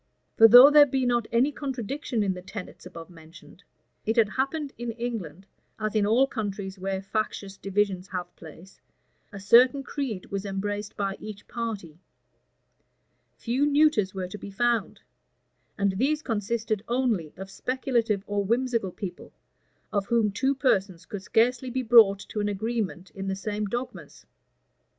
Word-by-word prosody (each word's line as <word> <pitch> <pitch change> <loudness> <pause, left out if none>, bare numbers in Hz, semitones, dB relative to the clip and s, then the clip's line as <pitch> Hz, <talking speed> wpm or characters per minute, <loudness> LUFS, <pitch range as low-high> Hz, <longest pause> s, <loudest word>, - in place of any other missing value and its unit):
For 225 - +8
though 245 +5 +10
there 295 -1 +8
be 265 -1 0
not 240 -2 +1
any 245 +5 +3
contradiction 270 -3 -3
in 195 -2 0
the 180 - -8
tenets 185 -1 -9
above 165 -1 -11
mentioned, 170 +3 -16 0.4
it 220 - -1
had 225 -3 +4
happened 275 +4 -2
in 240 0 -5
England, 215 -8 -5 0.3
as 215 -1 -2
in 210 -2 +2
all 240 +5 +4
countries 200 -6 -5
where 190 0 -3
factious 200 -1 -3
divisions 195 -1 -1
have 180 -2 -6
place; 165 +3 -14 0.5
a 200 - -8
certain 245 +7 +5
creed 255 -10 -4
was 195 -1 -3
embraced 205 +1 -4
by 195 -1 -2
each 210 -2 -9
party; 210 -9 -5 1.4
few 250 +4 -1
neuters 290 -9 +3
were 185 -1 -3
to 205 +3 -9
be - - -8
found; 235 +2 -1 0.8
and 200 -1 +2
these 300 +4 +1
consisted 215 -1 -2
only 235 - 0
of 190 +1 -8
speculative 235 -3 -1
or 205 0 -1
whimsical 230 -2 0
people, 180 -1 -8 0.6
of 200 -1 0
whom 230 -3 +2
two 270 +7 0
persons 195 -10 0
could 205 - -7
scarcely 245 +6 +1
be 255 +1 -2
brought 220 -4 +6
to 215 - -4
an 205 0 0
agreement 205 -3 -3
in 195 0 -6
the 190 - -1
same 210 +2 -3
dogmas. 240 +5 -6
210 Hz, 155 wpm, -26 LUFS, 195-245 Hz, 1.4 s, though